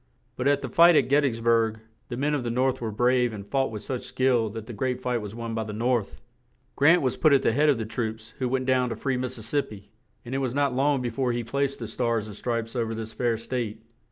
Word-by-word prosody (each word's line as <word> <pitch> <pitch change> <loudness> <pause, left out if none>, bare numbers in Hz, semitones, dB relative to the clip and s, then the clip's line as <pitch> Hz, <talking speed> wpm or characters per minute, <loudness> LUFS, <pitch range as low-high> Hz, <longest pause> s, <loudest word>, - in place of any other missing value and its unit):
But 125 - -1
at 140 0 +2
the - - -2
fight 170 +7 +6
at 130 -4 +3
Get 145 +2 +5
tys 115 -5 -1
burg 115 -1 +2 0.3
the 120 - -4
men 145 +3 0
of 145 -4 -1
the 120 - -2
North 130 +2 0
were 115 - -2
brave 125 +2 +2
and 100 -2 -7
fought 135 +5 0
with 105 -1 -7
such 130 -2 -3
skill 125 -4 +1
that 110 +1 -7
the 120 - -8
great 125 +3 -2
fight 125 -2 -1
was 105 0 -7
won 115 -1 -5
by 110 0 -1
the 105 -1 -6
North. 115 -1 -1 0.6
Grant 160 +4 +5
was 130 - 0
put 155 -2 +4
at 135 - +4
the - - +3
head 150 +4 +3
of 140 - +3
the 110 - -3
troops 110 0 -4
who 130 -2 0
went 130 0 0
down 130 -1 +2
to - - -3
free 135 -2 -1
Mis 125 0 -3
sis 110 - -8
sip 145 +5 -1
pi; 100 -1 -12 0.4
and 120 - -6
it 135 - 0
was 130 -2 -2
not 140 -2 +1
long 135 0 +1
be 120 - -2
fore 125 0 0
he 120 0 -2
placed 140 +4 -1
the 115 - -6
Stars 115 -1 -1
and 105 -2 -9
Stripes 115 +1 -3
over 115 -2 -1
this 110 0 -6
fair 120 -2 0
state. 115 -2 -4
120 Hz, 270 wpm, -26 LUFS, 115-130 Hz, 0.6 s, fight